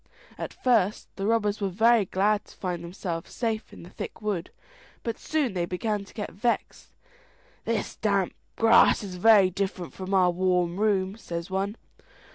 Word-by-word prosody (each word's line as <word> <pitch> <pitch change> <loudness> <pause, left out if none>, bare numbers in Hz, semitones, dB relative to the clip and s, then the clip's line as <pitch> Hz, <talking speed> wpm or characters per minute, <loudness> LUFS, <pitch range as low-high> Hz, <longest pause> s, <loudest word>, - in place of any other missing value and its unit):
At - - -5
first 220 -6 +2
the 195 0 -2
robbers 215 -2 +1
were 200 - +1
very 225 +3 +4
glad 205 +3 +1
to - - -17
find 180 -2 -3
themselves 170 -1 -5
safe 225 -3 -2
in - - -12
the 175 - -12
thick - - -7
wood, 205 -5 -2 0.5
but 230 -1 -3
they - - -21
soon 245 - 0
began 205 +2 -2
to - - -17
get 210 - -4
vexed. 235 +5 -2 0.8
"This 225 -2 -2
damp 200 -4 +1 0.2
grass 225 -1 +5
is 185 -3 -6
very 200 -1 +6
different 190 -2 -3
from 190 +1 -3
our 180 -2 +5
warm 180 -1 +1
room," 200 -2 +1
says 170 -5 -6
one. 195 +2 -1
200 Hz, 165 wpm, -27 LUFS, 180-215 Hz, 0.8 s, very